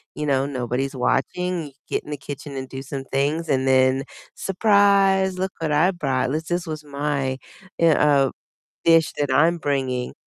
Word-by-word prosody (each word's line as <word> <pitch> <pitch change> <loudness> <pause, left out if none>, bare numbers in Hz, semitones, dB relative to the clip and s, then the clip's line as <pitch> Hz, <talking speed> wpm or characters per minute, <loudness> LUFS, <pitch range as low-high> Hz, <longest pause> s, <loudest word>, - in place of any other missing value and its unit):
you 150 - -3
know, 135 -2 +1
nobody's 130 +1 -3
watching. 180 +6 -1
You - - -13 0.2
get - - -1
in - - -13
the 150 - -3
kitchen 140 +1 -8
and 130 0 -5
do 135 - -6
some 135 0 -6
things 145 +5 -1
and 135 -1 +1
then, 130 0 +3 0.3
"Surprise, 195 -1 +3
look 190 0 -1
what 160 -2 -2
I 165 +6 +4
brought. 135 -8 -1
This 155 +2 -2
this 175 0 -1
was 155 -1 -5
my, 140 -2 -2 0.4
eh 165 -1 +5
uh, 140 -3 +3 0.5
dish 165 -1 +5
that 145 -2 0
I'm 165 +6 +4
bringing." 130 -5 -2
145 Hz, 175 wpm, -22 LUFS, 135-170 Hz, 0.5 s, eh